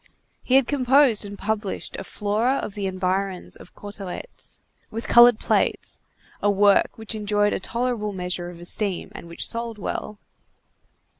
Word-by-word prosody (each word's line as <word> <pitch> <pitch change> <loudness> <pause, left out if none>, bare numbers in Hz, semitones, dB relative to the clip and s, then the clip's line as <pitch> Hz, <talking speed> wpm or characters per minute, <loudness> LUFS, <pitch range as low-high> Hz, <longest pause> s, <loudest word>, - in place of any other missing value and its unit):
He 255 - +1
had 270 -1 +6
composed 265 -4 +3
and 200 0 -8
published 210 -1 -3
a - - -5
Flora 215 +5 0
of 210 - -4
the 200 -1 -3
Environs 185 0 -2
of - - -15
Cauteretz, 205 - -6 0.3
with 225 +2 -5
colored 240 -1 +8
plates, - - 0 0.4
a 205 - +3
work 200 0 +4
which 220 0 -3
enjoyed 205 -1 +1
a - - -1
tolerable 235 0 -2
measure 180 -2 -4
of 175 -1 -11
esteem 185 +2 0
and - - -9
which 170 - 0
sold 230 -1 -3
well. 210 +1 -4
205 Hz, 150 wpm, -24 LUFS, 195-230 Hz, 0.4 s, colored